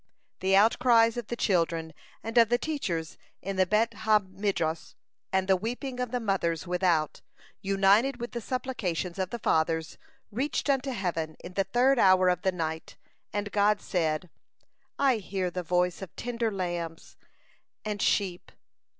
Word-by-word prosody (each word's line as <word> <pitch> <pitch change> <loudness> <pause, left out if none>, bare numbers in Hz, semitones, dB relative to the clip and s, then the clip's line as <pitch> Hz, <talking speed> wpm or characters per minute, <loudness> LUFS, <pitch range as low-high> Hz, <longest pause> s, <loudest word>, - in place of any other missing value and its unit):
The 190 +1 +2
out 210 +4 +5
cries 230 -2 +5
of 240 -3 -5
the 240 - -3
children 165 -6 0 0.3
and 225 +1 -5
of 230 -1 +5
the 240 - +3
teachers 190 - -3 0.2
in 195 +2 -4
the 185 -1 +3
Bet 225 +4 +2
ha 220 0 +3
Midrash, 185 -4 -2 0.4
and 190 0 +1
the 190 - +5
weeping 245 +6 -4
of 250 -1 -1
the 250 +1 -1
mothers 185 -6 -1
without, 175 -4 0 0.4
united 200 +7 +3
with 240 +1 -5
the 235 - -4
supplications 195 -8 -3
of 185 -1 -1
the 235 - -4
Fathers, 160 -5 0 0.3
reached 275 +5 0
unto 270 0 0
heaven 170 -9 -3
in 180 - -8
the 195 +1 0
third 245 +6 +3
hour 185 -2 +5
of 180 0 0
the 190 - +1
night, 160 -2 -4 0.4
and 205 0 -3
God 205 0 +3
said: 165 -3 -1 0.7
"I 270 -4 +3
hear 190 -3 -3
the 180 - -3
voice 180 +1 0
of 190 -4 -9
tender 235 -2 -2
lambs 175 -4 -4 0.7
and 210 -1 -3
sheep!" 185 -4 0
195 Hz, 160 wpm, -28 LUFS, 175-230 Hz, 0.7 s, out